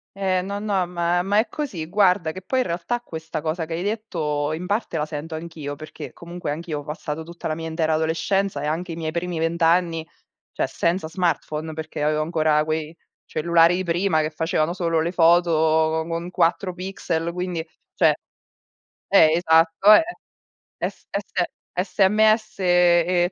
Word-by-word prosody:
Eh, 190 -2 +1
no, 200 +2 -4
no, 195 -4 0
ma 175 0 0
ma 200 +3 +1
è 220 - +3
così. 230 - -4
Guarda, 180 -3 +3
che 185 - -8
poi 260 +7 0
in - - -1
realtà 180 +8 -2
questa 160 -9 -6
cosa 160 +1 -2
che 165 - -6
hai 170 - -3
detto 160 -9 -2
in 175 +3 -4
parte 205 -3 -1
la 150 - 0
sento 155 +1 -6
anch'io, 155 -3 -6
perché 155 +1 -9
comunque 170 -1 -7
anch'io 155 0 -3
ho - - -8
passato 150 +1 -5
tutta 170 +1 -7
la 155 - -1
mia 165 +1 -5
intera 160 -1 0
adolescenza 165 +2 0
e 150 - -3
anche 165 +3 -2
i - - -6
miei 160 -1 -3
primi 170 0 -3
20 165 +1 0
anni, 165 -1 +2 0.4
cioè, - - -1
senza 170 -1 -1
smartphone, 160 -2 -2
perché 155 -1 -6
avevo 155 +1 +1
ancora 155 -2 +2
quei 155 +1 -3 0.3
cellulari 170 +2 +3
di 185 - -1
prima 170 -1 +1
che 155 +1 -2
facevano 160 +1 0
solo 165 -3 0
le 165 +2 0
foto 170 0 +4
co 160 0 +2
con 170 +2 -4
4 180 +2 +1
pixel, 175 -3 -3
quindi, 180 -2 -3 0.3
cioè - - +4 0.9
Eh, 160 -5 +6
esatto, 165 +4 +5
eh. 320 - +7 0.8
S - - -13
S 200 -2 -2 0.3
SMS 215 +3 +2
e 175 0 +3
170 Hz, 170 wpm, -23 LUFS, 160-180 Hz, 0.9 s, eh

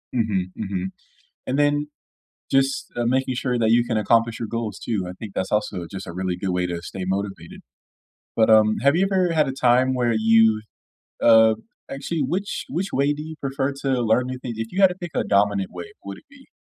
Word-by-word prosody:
Mhm, 100 -6 0
mhm. 95 -4 -3 0.6
And 130 +2 -1
then 145 0 +2 0.6
just, 135 0 +1
uh, 120 -1 0
making 130 +1 +1
sure 125 -1 -1
that 110 -1 +2
you 120 +1 +4
can 120 -2 -2
accomplish 115 +2 +2
your 115 - -4
goals 115 -3 -4
too. 105 -6 -2
I - - -6
think 100 +2 -9
that's 95 - -2
also 95 -4 -1
just 95 -1 -7
a - - -7
really 90 0 -2
good 95 +1 -3
way 90 0 0
to 85 -1 -5
stay 95 +2 -6
motivated. 95 -3 -4 0.8
But, 110 -1 +3
um, 110 -1 +5
have 140 +2 +4
you 185 +3 +3
ever 185 -3 +2
had 155 -3 +2
a - - -1
time 130 0 +3
where 120 -2 +1
you, 110 0 +4 0.6
uh, 110 -1 +6 0.3
actually, 150 +4 -3
which 185 +9 -3
which 190 +3 -3
way 140 +2 +2
do 145 - -7
you 160 0 -8
prefer 135 0 -1
to 130 -2 0
learn 120 +2 +2
new 130 0 -5
thin 125 -2 -5
If 115 +1 -5
you 190 - -3
had 190 - +9
to 180 - -6
pick 175 -2 -7
a - - +1
dominant 100 -1 +1
way, 90 -1 -8
would 100 0 -7
it - - -17
be? 280 -1 -18
115 Hz, 215 wpm, -23 LUFS, 100-135 Hz, 0.8 s, had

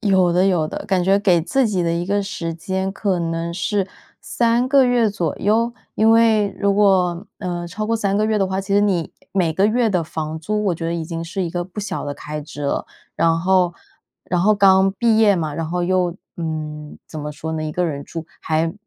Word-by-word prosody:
有 190 -4 +3
的 180 +2 +3
有 170 -5 +2
的。 - - -6
感 190 -3 +1
觉 195 +1 +4
给 185 -5 +3
自 260 - +1
己 190 -4 0
的 170 0 0
一 170 +1 -1
个 200 +1 +1
时 170 -4 -4
间 190 +3 -2
可 195 -4 -1
能 165 0 -2
是 195 +1 -1 0.3
3 235 +1 +1
个 275 -1 +5
月 245 -2 +3
左 175 -4 -2
右， 230 +3 +1 0.2
因 220 +1 +4
为 225 -2 +4
如 200 0 +2
果， 190 -2 +2
呃， 175 -3 -4
超 215 +5 -4
过 230 0 +1
3 200 -2 0
个 215 - +2
月 215 -1 +1
的 195 - +2
话， 190 +1 -2
其 195 +1 -5
实 205 - +5
你 185 -5 0 0.2
每 175 -4 +1
个 195 +5 +3
月 230 0 +2
的 180 -3 +1
房 155 0 -4
租， 210 +6 -2
我 180 - +2
觉 165 0 -4
得 170 - -1
已 165 -1 -3
经 165 0 -5
是 185 +3 -3
一 170 - -2
个 175 +1 -2
不 190 +4 -7
小 190 -5 -4
的 145 - -4
开 150 +1 -6
支 145 -1 -9
了。 140 - -1 0.3
然 165 0 +3
后 180 -1 +2 0.5
然 180 -1 0
后 210 +3 +4
刚 195 -1 +5
毕 225 +1 +2
业 210 -3 +5
嘛， 155 -3 -2
然 165 -1 -3
后 180 +1 -1
又 180 -1 +1 0.2
嗯， 155 -2 -5
怎 155 - -8
么 150 0 -5
说 160 +2 -5
呢？ 155 -1 -2
1 155 - -4
个 180 +2 0
人 140 -3 -3
住， 165 -1 -6 0.2
还 160 +1 0
185 Hz, 240 characters per minute, -20 LUFS, 165-205 Hz, 0.5 s, 个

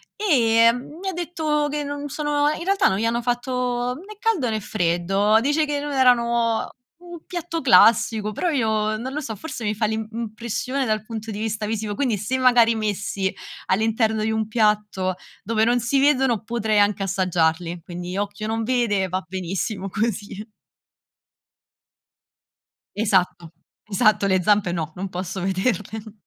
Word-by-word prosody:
e 230 - +4
mi 305 +10 -8
ha - - -4
detto 315 -4 -1
che 295 0 -2
non 285 0 -5
sono 295 0 0
in - - -6
realtà 395 +1 +3
non 190 - +1
gli 225 - 0
hanno 235 +1 0
fatto 245 0 -1
né 400 +7 -11
caldo 420 - +1
né 220 -1 -1
freddo. 195 +3 +1
Dice 295 +4 +2
che 290 -1 -2
non 295 - -4
erano 235 -3 +2 0.3
un 345 -2 -11
piatto 345 -2 -4
classico, 220 -1 +4
però 345 - -1
io 220 -6 0
non 250 +4 -5
lo 300 - -2
so, 225 -6 -5
forse 240 +1 -7
mi 210 - 0
fa 215 +1 0
l'im 220 0 -2
impressione 235 +4 -3
dal 215 -2 -1
punto 220 0 -6
di 205 - -5
vista 215 -1 -2
visivo, 210 -1 -3
quindi 245 -7 0
se 215 +7 -2
magari 240 -3 +5
messi 200 -2 -2 0.4
all'interno 220 +1 +1
di 220 - 0
un 220 -1 -1
piatto 210 -4 +1 0.3
dove 220 +1 +1
non 245 +1 +2
si 270 +4 +1
vedono 265 -6 +2
potrei 220 -3 0
anche 205 -1 +2
assaggiarli, 175 -3 0
quindi 175 +2 -6
occhio 205 +1 -3
non 225 +1 -1
vede 220 -6 +1
va 185 0 -2
benissimo 190 +2 -3
così. 210 0 -3 2.5
Esatto, 180 -5 0 0.3
esatto 205 0 +2
le 190 -1 +2
zampe 205 -3 +3
no, 160 -2 -3
non 190 +1 -5
posso 185 +1 -5
vederle. 210 +3 -2
220 Hz, 160 wpm, -23 LUFS, 200-255 Hz, 2.5 s, magari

